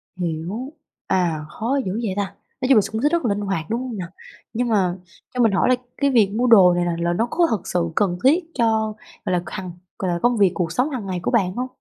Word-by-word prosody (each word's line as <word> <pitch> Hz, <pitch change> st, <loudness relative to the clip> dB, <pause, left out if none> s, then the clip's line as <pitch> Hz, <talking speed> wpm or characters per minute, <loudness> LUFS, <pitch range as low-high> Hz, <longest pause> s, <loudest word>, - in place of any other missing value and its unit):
Hiểu, 180 Hz, -, -4 dB, 0.3 s
à, 170 Hz, -4 st, +1 dB
khó 245 Hz, +6 st, -1 dB
dữ 185 Hz, -, -2 dB
vậy 200 Hz, -4 st, -1 dB
ta! 205 Hz, -, +2 dB, 0.4 s
Nói 255 Hz, -, 0 dB
chung 270 Hz, -, +7 dB
là -, -, +7 dB
x -, -, -6 dB
cũng 220 Hz, +1 st, -2 dB
rất 305 Hz, +3 st, +1 dB
là -, -, +2 dB
linh -, -, -3 dB
hoạt, 195 Hz, -6 st, -2 dB
đúng 230 Hz, +2 st, -1 dB
hông 250 Hz, -4 st, -5 dB
nào? 180 Hz, -3 st, -4 dB, 0.5 s
Nhưng 245 Hz, +2 st, 0 dB
mà 190 Hz, -5 st, +2 dB, 0.4 s
cho 250 Hz, -, -4 dB
mình 230 Hz, -3 st, +4 dB
hỏi 195 Hz, -, +2 dB
là 255 Hz, -, +5 dB, 0.2 s
cái 280 Hz, -, +2 dB
việc 220 Hz, -6 st, +4 dB
mua 240 Hz, +3 st, +1 dB
đồ 190 Hz, -7 st, +7 dB
này 175 Hz, 0 st, 0 dB
là 170 Hz, -1 st, -1 dB
là 170 Hz, 0 st, +1 dB
nó 225 Hz, +7 st, 0 dB
có 345 Hz, -1 st, +3 dB
thật 215 Hz, -6 st, -2 dB
sự 170 Hz, -1 st, 0 dB
cần 190 Hz, -4 st, +1 dB
thiết 315 Hz, +7 st, +4 dB
cho, 220 Hz, -2 st, +1 dB, 0.3 s
gọi -, -, 0 dB
là, 175 Hz, -1 st, +1 dB
hằng 185 Hz, -1 st, -6 dB, 0.3 s
gọi 185 Hz, -2 st, -1 dB
là, 170 Hz, -, -1 dB
công 240 Hz, -1 st, +3 dB
việc, 200 Hz, -3 st, +4 dB
cuộc 170 Hz, -3 st, -2 dB
sống 250 Hz, -, +1 dB
hàng 255 Hz, -8 st, -4 dB
ngày 185 Hz, -2 st, -3 dB
của -, -, 0 dB
bạn 195 Hz, -7 st, +2 dB
hông? 250 Hz, +1 st, -2 dB
210 Hz, 265 wpm, -22 LUFS, 180-245 Hz, 0.5 s, chung